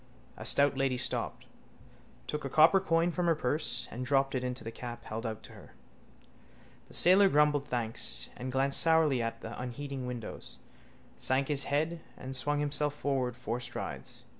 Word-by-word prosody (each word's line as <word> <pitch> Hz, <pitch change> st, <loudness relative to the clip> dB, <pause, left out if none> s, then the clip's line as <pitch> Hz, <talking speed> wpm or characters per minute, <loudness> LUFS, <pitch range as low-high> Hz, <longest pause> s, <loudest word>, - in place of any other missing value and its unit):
A -, -, -7 dB
stout 140 Hz, 0 st, +4 dB
lady 135 Hz, -1 st, 0 dB
stopped, -, -, 0 dB, 0.8 s
took 150 Hz, -, -4 dB
a 135 Hz, -, -3 dB
copper 160 Hz, +7 st, +6 dB
coin 170 Hz, -2 st, +1 dB
from 175 Hz, 0 st, -1 dB
her 165 Hz, -, +4 dB
purse 125 Hz, -3 st, +2 dB
and 125 Hz, -, -5 dB
dropped 135 Hz, +1 st, +1 dB
it 130 Hz, -1 st, -1 dB
into 125 Hz, 0 st, -4 dB
the 115 Hz, -, -6 dB
cap 120 Hz, 0 st, -8 dB
held 115 Hz, +2 st, -4 dB
out 110 Hz, 0 st, -6 dB
to -, -, -12 dB
her. -, -, -15 dB, 1.1 s
The -, -, -5 dB
sailor 190 Hz, +2 st, +6 dB
grumbled 150 Hz, -2 st, +3 dB
thanks, 110 Hz, -, -1 dB, 0.2 s
glanced 135 Hz, +2 st, +1 dB
sourly 160 Hz, -6 st, +3 dB
at 115 Hz, 0 st, -4 dB
the 115 Hz, -, -7 dB
unheeding 130 Hz, +1 st, -5 dB
windows, 120 Hz, -3 st, -5 dB, 0.6 s
sank 130 Hz, +2 st, +1 dB
his 140 Hz, -2 st, 0 dB
head 160 Hz, +4 st, -1 dB, 0.2 s
and 130 Hz, +1 st, -6 dB
swung 145 Hz, +3 st, 0 dB
himself 145 Hz, 0 st, 0 dB
forward 130 Hz, -4 st, -1 dB
four 125 Hz, -1 st, -3 dB
strides. 125 Hz, 0 st, -6 dB
135 Hz, 165 wpm, -31 LUFS, 125-150 Hz, 1.1 s, copper